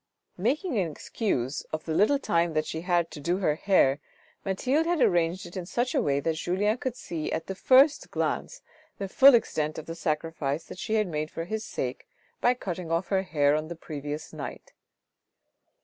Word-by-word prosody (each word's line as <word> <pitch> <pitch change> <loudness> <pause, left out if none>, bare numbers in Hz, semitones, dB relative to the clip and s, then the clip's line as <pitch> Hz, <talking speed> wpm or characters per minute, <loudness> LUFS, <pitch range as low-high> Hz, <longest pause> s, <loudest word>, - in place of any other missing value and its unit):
Making 260 - 0
an 175 -4 0
excuse 145 - -2
of 155 0 -4
the 160 - -2
little 210 - +4
time 170 - +1
that 155 0 +1
she 160 - -4
had 180 +2 -6
had 170 -1 +1
to - - -8
do 170 +5 0
her 180 -6 +2
hair, 150 -5 +3 0.4
Mathilde 260 - +1
had 345 -1 +1
arranged 175 -4 +2
it 175 - -11
in 180 -2 -5
such 245 +5 -1
a 275 - +2
way 140 -9 +1
that 165 +3 0
Julien 205 +7 0
could 260 -4 -3
see 160 -9 -4
at 160 - -2
the 190 - -4
first 270 +8 +4
glance - - -2 0.3
the 195 - -3
full 270 +6 +7
extent 155 -9 0
of 160 - -6
the 165 - -5
sacrifice 155 -2 -2
that - - -11
she 220 - -1
had 215 -1 +3
made 155 -3 -3
for 165 - -5
his 220 +4 -3
sake, 130 -10 -4 0.3
by 245 +1 +3
cutting 180 -7 -5
off 170 +2 0
her 190 -1 +2
hair 150 -6 +2
on 155 +1 -2
the 170 - -6
previous 150 -1 -6
night. - - -8
175 Hz, 200 wpm, -27 LUFS, 155-215 Hz, 0.4 s, full